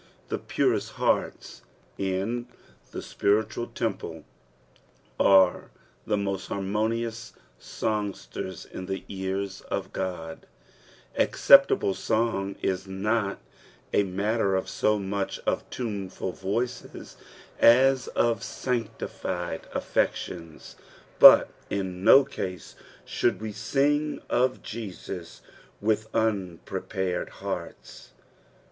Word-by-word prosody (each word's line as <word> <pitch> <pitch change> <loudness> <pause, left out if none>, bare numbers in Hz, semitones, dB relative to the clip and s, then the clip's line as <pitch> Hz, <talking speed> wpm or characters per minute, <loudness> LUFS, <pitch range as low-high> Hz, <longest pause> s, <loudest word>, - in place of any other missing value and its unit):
The - - -2
purest - - 0
hearts - - -1 0.3
in 100 +6 -2 0.4
the - - -6
tpiritual 110 +3 0
temple - - -3 0.9
are 95 -2 +5 0.4
the 105 - +2
mosl 100 -2 -2
harmonious 110 +3 -2 0.3
songsters 100 -3 -4
in 95 - -8
the 95 0 -4
ears 95 0 -3
qf - - -2
Qod; 90 -4 -4 0.8
aceeptoiile 95 - +5
song 100 0 0
is 95 0 -1
not 100 +2 -1 0.6
a - - +5
matter 100 +1 0
so 105 0 +1
much 100 0 -2
of - - -1
Ivnefid 100 -6 -4
voices 115 +6 -4 0.4
as 130 +1 +5
of 115 -1 +1
s<aKtijUd 105 -8 -4
affertionB, 85 -3 -2 0.4
birf - - +10 0.2
in 95 -2 -3
no 135 +5 +8
oast 90 -10 -6 0.3
should 120 - 0
toe 110 - -6
stnj; 145 +7 0
q/' 130 +1 +1
.Jesus 105 -6 -7 0.4
uiHh 110 0 +1
unprepared 95 -3 -2
hearts. - - -7
100 Hz, 90 wpm, -27 LUFS, 95-115 Hz, 0.9 s, birf